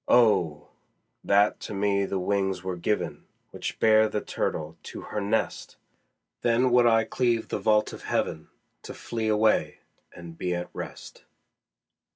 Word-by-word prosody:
Oh! 90 -11 +3 0.5
that 100 +1 +3
to 105 - -6
me 100 0 +1
the 95 - -2
wings 95 -1 -1
were 95 -1 -3
given 90 0 -2 0.2
Which - - -5
bear 110 0 +5
the 105 - -1
turtle 80 -5 -3
to - - -8
her 105 - -4
nest! 105 +3 -2 0.6
Then 120 +2 +2
would 120 0 +5
I 115 -1 +4
cleave 120 0 0
the - - -2
vault 105 -1 +2
of - - -10
heaven, - - -2 0.3
To - - -9
flee 115 -2 -4
away 110 0 +2 0.3
and 85 -1 -11
be 90 -1 -1
at 90 0 -5
rest. - - -9
105 Hz, 150 wpm, -26 LUFS, 90-110 Hz, 0.6 s, bear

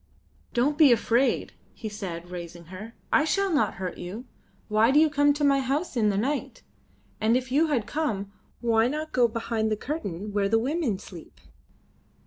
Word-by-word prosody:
"Don't 285 +6 +1
be 295 -5 +8
afraid," 240 +3 +2 0.2
he 225 - -6
said, 180 -5 -6
raising 170 -1 -8
her. 215 +5 -9 0.2
"I - - +5
shall 390 +3 +1
not 295 - +1
hurt 180 -1 -5
you. 205 +8 -7 0.4
Why 215 +1 +3
do 285 +3 +5
you 310 -1 +4
come 290 0 +4
to 295 +1 -3
my 275 -1 +4
house 275 +5 -2
in 220 -3 +3
the 200 - 0
night? 270 +7 -2 0.6
And 225 +3 +3
if 255 0 -5
you 305 +5 +3
had 285 -6 +1
to - - -13
come, 215 -11 -2 0.3
why 230 -1 +3
not 305 +4 -3
go 245 -2 +4
behind 225 -1 -2
the 215 - 0
curtain 210 - -5
where 200 -1 +1
the 225 - +4
women 260 - 0
sleep?" 180 -3 -12
235 Hz, 185 wpm, -26 LUFS, 205-290 Hz, 0.6 s, be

